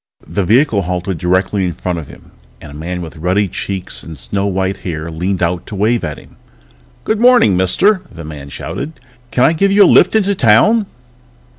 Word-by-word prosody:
The 100 Hz, -, -2 dB
vehicle 115 Hz, -, +3 dB
halted 90 Hz, -1 st, -3 dB
directly 95 Hz, +3 st, 0 dB
in 90 Hz, -, -2 dB
front 90 Hz, -1 st, -3 dB
of 75 Hz, -, -9 dB
him -, -, -15 dB, 0.3 s
and -, -, -11 dB
a -, -, -11 dB
man 85 Hz, +4 st, -5 dB
with 80 Hz, -1 st, -10 dB
ruddy 90 Hz, +5 st, +1 dB
cheeks 95 Hz, +1 st, -4 dB
and 80 Hz, -2 st, -10 dB
snow 95 Hz, +11 st, -2 dB
white 95 Hz, 0 st, -1 dB
hair 85 Hz, -2 st, -5 dB
leaned 90 Hz, +3 st, -2 dB
out 85 Hz, +1 st, -2 dB
to 105 Hz, -, -7 dB
wave 110 Hz, +3 st, +1 dB
at 75 Hz, -2 st, -4 dB
him. -, -, -17 dB, 0.7 s
"Good 220 Hz, -1 st, -1 dB
morning, 245 Hz, -, +5 dB
mister!" 180 Hz, -, +2 dB
the 85 Hz, -, -10 dB
man 75 Hz, -2 st, -9 dB
shouted. 155 Hz, -, -6 dB, 0.4 s
"Can 125 Hz, -, +1 dB
I 160 Hz, -, +4 dB
give 195 Hz, +4 st, +1 dB
you 200 Hz, +1 st, +6 dB
a -, -, +6 dB
lift -, -, +5 dB
into 200 Hz, -2 st, +2 dB
town?" 195 Hz, -, +3 dB
95 Hz, 195 wpm, -15 LUFS, 85-120 Hz, 0.7 s, you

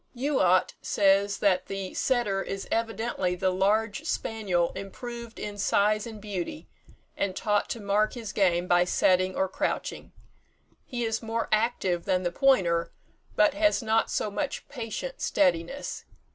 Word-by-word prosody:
Youatt 240 Hz, -10 st, +2 dB
says 195 Hz, +1 st, +3 dB
that 195 Hz, -3 st, +2 dB
the 195 Hz, -1 st, -5 dB
setter 235 Hz, -7 st, +1 dB
is 195 Hz, 0 st, -5 dB
evidently 225 Hz, -5 st, -1 dB
the 185 Hz, +1 st, +1 dB
large 205 Hz, +3 st, +1 dB
spaniel 190 Hz, -6 st, 0 dB
improved 235 Hz, +4 st, -7 dB
in 205 Hz, -1 st, -6 dB
size 210 Hz, +2 st, +2 dB
and 220 Hz, -2 st, -8 dB
beauty, 205 Hz, -, -5 dB, 0.5 s
and 190 Hz, -2 st, -1 dB
taught 210 Hz, 0 st, 0 dB
to 235 Hz, -, -3 dB
mark 205 Hz, +1 st, +1 dB
his 225 Hz, -4 st, -6 dB
game 180 Hz, -3 st, +2 dB
by 175 Hz, 0 st, +4 dB
setting 185 Hz, +1 st, +2 dB
or 190 Hz, -, +1 dB
crouching. -, -, -3 dB, 0.8 s
He 245 Hz, -3 st, -3 dB
is 225 Hz, -1 st, -1 dB
more 225 Hz, 0 st, -2 dB
active 215 Hz, -6 st, +1 dB
than 185 Hz, 0 st, +1 dB
the 175 Hz, -, 0 dB
pointer, 175 Hz, -9 st, +2 dB, 0.4 s
but 210 Hz, -, +4 dB
has 310 Hz, -4 st, +2 dB
not 225 Hz, 0 st, +2 dB
so 210 Hz, -, -1 dB
much 275 Hz, +7 st, -3 dB
patient 280 Hz, -, -5 dB
steadiness. 180 Hz, +7 st, 0 dB
205 Hz, 145 wpm, -27 LUFS, 185-230 Hz, 0.8 s, by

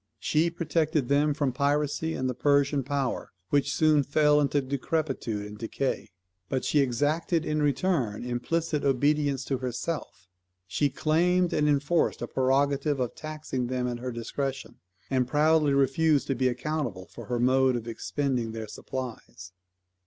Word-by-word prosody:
She 160 Hz, +2 st, +2 dB
protected 160 Hz, -4 st, 0 dB
them 145 Hz, +1 st, +3 dB
from 140 Hz, -3 st, 0 dB
piracy 145 Hz, +4 st, 0 dB
and 130 Hz, -, -1 dB
the 130 Hz, -, -1 dB
Persian 140 Hz, +2 st, +2 dB
power, 135 Hz, -1 st, -2 dB, 0.2 s
which 140 Hz, 0 st, +2 dB
soon 155 Hz, -1 st, +4 dB
fell 150 Hz, +1 st, +3 dB
into 145 Hz, 0 st, +2 dB
decrepitude 135 Hz, -5 st, -2 dB
and 105 Hz, 0 st, -9 dB
decay; 130 Hz, +4 st, -2 dB, 0.4 s
but 130 Hz, -, -1 dB
she 150 Hz, -, +2 dB
exacted 150 Hz, +6 st, +1 dB
in 155 Hz, 0 st, 0 dB
return 140 Hz, -, 0 dB
implicit 150 Hz, +6 st, -1 dB
obedience 140 Hz, 0 st, +1 dB
to 135 Hz, -2 st, -1 dB
herself. 125 Hz, -, -4 dB, 0.4 s
She 95 Hz, +10 st, 0 dB
claimed 175 Hz, +5 st, +2 dB
and 150 Hz, 0 st, +2 dB
enforced 145 Hz, +4 st, +1 dB
a -, -, -3 dB
prerogative 140 Hz, +2 st, +1 dB
of 125 Hz, -2 st, -1 dB
taxing 155 Hz, -5 st, -4 dB
them 125 Hz, 0 st, -1 dB
at 120 Hz, -1 st, -3 dB
her 125 Hz, +1 st, -4 dB
discretion; 130 Hz, +3 st, -4 dB, 0.3 s
and 130 Hz, -2 st, +2 dB
proudly 150 Hz, +1 st, +3 dB
refused 140 Hz, +2 st, +3 dB
to 135 Hz, -, +1 dB
be 130 Hz, +1 st, +1 dB
accountable 125 Hz, -6 st, -3 dB
for -, -, -11 dB
her 120 Hz, -1 st, -2 dB
mode 130 Hz, +1 st, +3 dB
of 120 Hz, -1 st, -4 dB
expending 120 Hz, -1 st, -2 dB
their 110 Hz, -1 st, -5 dB
supplies. 115 Hz, -7 st, -7 dB
140 Hz, 150 wpm, -27 LUFS, 125-150 Hz, 0.4 s, soon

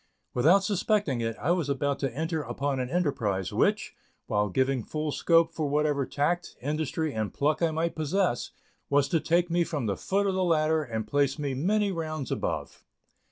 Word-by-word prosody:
Without 175 Hz, +10 st, +4 dB
suspecting 200 Hz, -, +1 dB
it, 115 Hz, -1 st, -2 dB
I 165 Hz, -, +1 dB
was 175 Hz, -5 st, 0 dB
about 140 Hz, 0 st, 0 dB
to 135 Hz, -3 st, -1 dB
enter 160 Hz, +5 st, -2 dB
upon 140 Hz, -2 st, -2 dB
an 125 Hz, -1 st, -2 dB
enterprise, 120 Hz, -, -1 dB
which, -, -, +1 dB, 0.3 s
while 105 Hz, 0 st, 0 dB
giving 130 Hz, +3 st, +1 dB
full 155 Hz, +3 st, -3 dB
scope 165 Hz, +2 st, +3 dB
for 155 Hz, -3 st, -1 dB
whatever 145 Hz, -2 st, +1 dB
tact, 170 Hz, +5 st, -1 dB
industry 155 Hz, +2 st, -2 dB
and 110 Hz, -2 st, -2 dB
pluck 150 Hz, +3 st, 0 dB
I 165 Hz, -, +3 dB
might 160 Hz, +2 st, -1 dB
possess, 160 Hz, -3 st, 0 dB, 0.4 s
was 140 Hz, -1 st, +3 dB
to 165 Hz, -, +2 dB
take 170 Hz, +2 st, +1 dB
me 175 Hz, 0 st, +3 dB
from 150 Hz, -7 st, -3 dB
the 100 Hz, -2 st, 0 dB
foot 200 Hz, -, 0 dB
of 195 Hz, -, +1 dB
the 185 Hz, 0 st, +1 dB
ladder 160 Hz, -2 st, +2 dB
and 110 Hz, -5 st, -4 dB
place 140 Hz, +3 st, +1 dB
me 145 Hz, -3 st, -2 dB
many 200 Hz, +9 st, +1 dB
rounds 155 Hz, -5 st, -4 dB
above. -, -, -3 dB
150 Hz, 185 wpm, -28 LUFS, 135-170 Hz, 0.4 s, Without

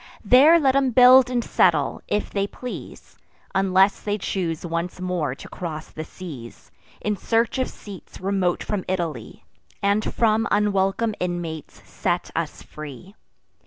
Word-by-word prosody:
There 285 Hz, +10 st, +7 dB
let 275 Hz, -4 st, +4 dB
them 270 Hz, 0 st, +2 dB
build 250 Hz, +1 st, +7 dB
and 245 Hz, -2 st, 0 dB
settle, -, -, +2 dB
if 210 Hz, -, -1 dB
they 200 Hz, -1 st, -1 dB
please; 250 Hz, +4 st, -9 dB, 0.3 s
Unless 195 Hz, +1 st, +3 dB
they 205 Hz, 0 st, -2 dB
choose 175 Hz, -5 st, -3 dB
once 170 Hz, +2 st, -3 dB
more 180 Hz, -7 st, -2 dB
to -, -, -11 dB
cross 160 Hz, -3 st, -7 dB
the 155 Hz, -, -6 dB
seas, 150 Hz, -10 st, -10 dB, 0.3 s
In 210 Hz, 0 st, -1 dB
search 230 Hz, +5 st, 0 dB
of 260 Hz, -, 0 dB
seats 200 Hz, -3 st, -12 dB
remote 190 Hz, -2 st, 0 dB
from 205 Hz, -3 st, -3 dB
Italy, 170 Hz, -11 st, -4 dB, 0.3 s
And 200 Hz, +2 st, +1 dB
from 225 Hz, -1 st, +2 dB
unwelcome 205 Hz, +1 st, +1 dB
inmates 175 Hz, -4 st, -5 dB
set -, -, -2 dB
us -, -, -3 dB
free. 150 Hz, +5 st, -10 dB
195 Hz, 140 wpm, -23 LUFS, 175-225 Hz, 0.3 s, There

